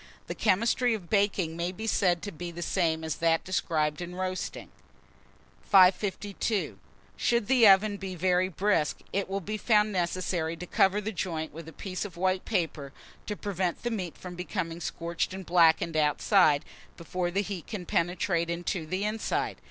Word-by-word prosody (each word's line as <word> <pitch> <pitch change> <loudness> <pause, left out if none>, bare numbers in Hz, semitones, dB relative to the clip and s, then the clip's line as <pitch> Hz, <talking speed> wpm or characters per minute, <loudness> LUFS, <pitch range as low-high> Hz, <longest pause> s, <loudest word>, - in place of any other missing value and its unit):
The - - -4
chemistry 230 +4 +2
of 185 -6 -10
baking 200 -5 +1
may 170 +1 -2
be 205 +4 -7
said 180 -5 +2
to 205 - -4
be 175 +1 -6
the 170 0 -6
same 160 -4 0
as 160 -1 -3
that 165 -1 +2
described 155 -4 -1
in 175 0 -6
roasting. 185 0 -4 0.9
552. 195 +2 +2 0.4
SHOULD 235 -2 +1
THE 250 -4 +6
OVEN 200 +1 +5
BE 190 -2 -6
VERY 180 +1 +2
BRISK, 185 -3 +1 0.2
it 200 -1 -1
will 195 +1 -2
be 215 +4 -4
found 210 -1 +3
necessary 175 -2 -1
to 180 - -7
cover 195 +3 +2
the 215 +2 -3
joint 165 -6 -3
with 165 +1 -9
a - - -8
piece 185 +4 -5
of 190 -5 -8
white 185 +1 0
paper, 165 -9 -2 0.4
to 210 - -2
prevent 190 -4 -2
the 240 - -1
meat 185 -7 -4
from 180 -1 -8
being 170 -1 -4
scorched 170 +2 -3
and 190 -1 -7
blackened 165 -1 +4
outside, 150 +1 +3 0.3
before 175 +1 -3
the 195 +3 0
heat 195 -4 -6
can 205 -6 -5
penetrate 170 0 0
into 170 -1 -3
the 185 +5 -2
inside. 215 +1 -1
185 Hz, 170 wpm, -28 LUFS, 170-200 Hz, 0.9 s, THE